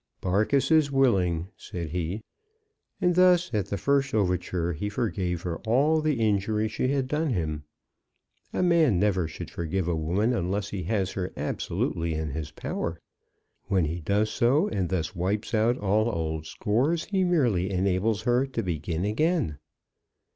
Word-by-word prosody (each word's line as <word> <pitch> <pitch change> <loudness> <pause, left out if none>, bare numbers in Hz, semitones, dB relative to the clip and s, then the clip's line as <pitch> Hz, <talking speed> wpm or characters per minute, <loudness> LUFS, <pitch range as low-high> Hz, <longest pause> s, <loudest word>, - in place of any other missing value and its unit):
"Barkis 110 - +1
is 155 -3 +4
willing," 95 -11 +2
said 85 -5 -6
he. 90 +5 -3 0.8
And 180 -2 +3
thus, 180 -3 +4
at 105 -3 0
the 100 - -2
first 140 -1 +1
overture, 90 -3 0
he 105 +7 -3
forgave 95 -6 -2
her 85 -2 -3
all 145 +8 +2
the 150 -5 0
injury 105 0 +1
she 110 +3 -1
had 135 -1 0
done 150 +3 0
him. 75 -5 -2 0.9
A - - 0
man 165 - +4
never 95 -4 +2
should 80 - -8
forgive 85 +2 -2
a 85 - +1
woman 90 +10 +1
unless 100 0 -1
he 100 -3 -4
has 95 -1 0
her 90 -1 -3
absolutely 85 -1 -2
in 80 -2 -3
his 75 +1 -4
power. 85 +1 -4 0.7
When 95 -4 +2
he 80 +3 -3
does 100 +6 0
so, 130 +6 +3
and 95 -5 -1
thus 90 -1 -2
wipes 100 +6 -2
out 115 +3 +3
all 105 +3 +1
old 80 -5 -3
scores, 135 - 0
he 195 -2 0
merely 120 - +2
enables 100 +3 0
her 125 +2 +2
to 120 -4 -3
begin 85 0 -2
again. 110 - 0
100 Hz, 160 wpm, -27 LUFS, 90-125 Hz, 0.9 s, is